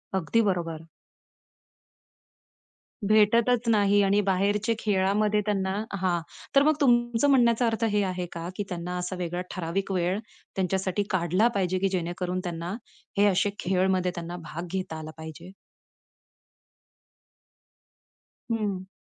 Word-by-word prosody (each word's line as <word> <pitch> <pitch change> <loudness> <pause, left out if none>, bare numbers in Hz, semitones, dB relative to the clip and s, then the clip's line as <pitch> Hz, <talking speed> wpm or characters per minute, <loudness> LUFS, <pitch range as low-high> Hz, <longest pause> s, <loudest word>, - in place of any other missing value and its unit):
अगदी 190 +6 +2
बरोबर. 165 -3 -3 2.2
भेटतच 230 +3 +4
नाही 205 -2 +4
आणि 195 +1 +3
बाहेरचे 205 +4 +1
खेळामध्ये 210 +1 +2
त्यांना 195 -2 0 0.2
हां, 180 -3 0 0.3
तर 275 - +7
मग 310 +1 +4
तुमचं 240 +1 +3
म्हणण्याचा 240 -2 +4
अर्थ 225 0 -1
हे 205 -1 +2
आहे 185 -1 -2
का, 170 0 -5
की 205 - -2
त्यांना 180 0 -4
असा 180 +1 -3
वेगळा 175 0 -2
ठराविक 185 +3 -3
वेळ 185 +1 0 0.4
त्यांच्यासाठी 190 +1 0
काढला 185 +4 +2
पाहिजे, 185 -1 +1
की 195 - +1
जेणेकरून 180 0 -2
त्यांना 175 +2 -4 0.4
हे 205 - +5
असे 195 +1 +2
खेळमध्ये 185 0 +1
त्यांना 170 +1 -5
भाग 170 +3 -6
घेता 185 -4 -3
आला 155 0 -7
पाहिजे? 160 +3 -9 3.0
हं. 205 -5 -2
190 Hz, 120 wpm, -27 LUFS, 175-210 Hz, 3.0 s, तर